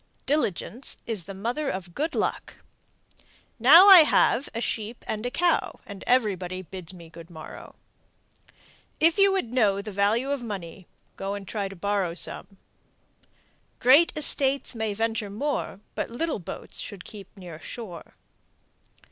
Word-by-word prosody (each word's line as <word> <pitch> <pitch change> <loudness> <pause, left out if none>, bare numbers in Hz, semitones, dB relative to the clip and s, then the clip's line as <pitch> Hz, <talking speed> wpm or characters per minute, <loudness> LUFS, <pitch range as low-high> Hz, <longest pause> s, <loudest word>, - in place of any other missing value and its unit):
Diligence 260 - -2
is 215 -7 -2
the 195 - -7
mother 245 +9 -2
of 185 -5 -6
good 315 - -2
luck. - - -2 1.0
Now 315 - +8
I 385 -3 +11
have 285 -3 +3
a 230 - -5
sheep 230 0 -4
and 215 0 -3
a - - -2
cow, 340 +7 0
everybody 195 -4 -1
bids 180 0 -9
me 170 -3 -13
good 165 +1 -13
morrow. 160 -2 -11 1.2
If 330 +4 +3
you 395 0 +6
would 370 -12 -2
know 205 -6 +2
the 210 +1 -6
value 210 +7 +1
of 285 -3 -2
money, 190 -5 -7 0.3
go 195 +1 -4
and 200 -2 -8
try 205 -1 -3
to 195 - -10
borrow 195 -2 -1
some. 195 +2 0 1.2
Great 275 +7 +6
estates 280 -3 +2
may 220 -3 -3
venture 225 -1 -2
more, 220 -2 -3
but - - -3
little 300 +3 -3
boats 170 - -8
should 195 -3 -8
keep 200 -2 -12
near 175 -4 -10
shore. 185 -3 -9
215 Hz, 145 wpm, -25 LUFS, 190-265 Hz, 1.2 s, I